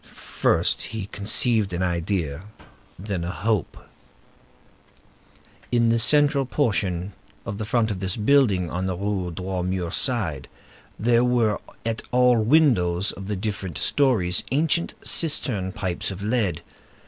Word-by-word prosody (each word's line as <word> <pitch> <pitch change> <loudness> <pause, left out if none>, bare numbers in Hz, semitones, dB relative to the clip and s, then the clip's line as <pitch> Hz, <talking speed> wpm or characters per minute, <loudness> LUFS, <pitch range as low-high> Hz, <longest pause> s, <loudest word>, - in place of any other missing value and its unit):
First - - 0 0.2
he 100 - -4
conceived 105 0 +1
an 85 +1 -1
idea, 85 -2 -2 0.5
then 95 -2 -4
a 85 - -3
hope. 105 0 -1 1.9
In 120 -1 +3
the 115 0 +2
central 140 +2 +4
portion 100 - -1 0.3
of 100 +1 -5
the 110 - -3
front 115 0 +1
of 95 - -4
this 95 +1 -2
building, 105 -6 +3
on 90 +2 -2
the 90 -2 -3
Rue 100 -2 -2
Droit 90 +1 -4
Mur 90 -2 -2
side, 95 - -1 0.5
there 120 +1 +3
were 120 -4 +2 0.3
at 115 0 -2
all 125 -1 +4
the 110 +1 -1
windows 105 - +3
of 95 0 -9
the 105 - -2
different 100 -2 -4
stories 110 -11 +1
ancient 160 +4 0
cistern 120 - +1
pipes 95 -3 -3
of 100 0 -7
lead. 105 -7 -1
105 Hz, 135 wpm, -24 LUFS, 90-120 Hz, 1.9 s, central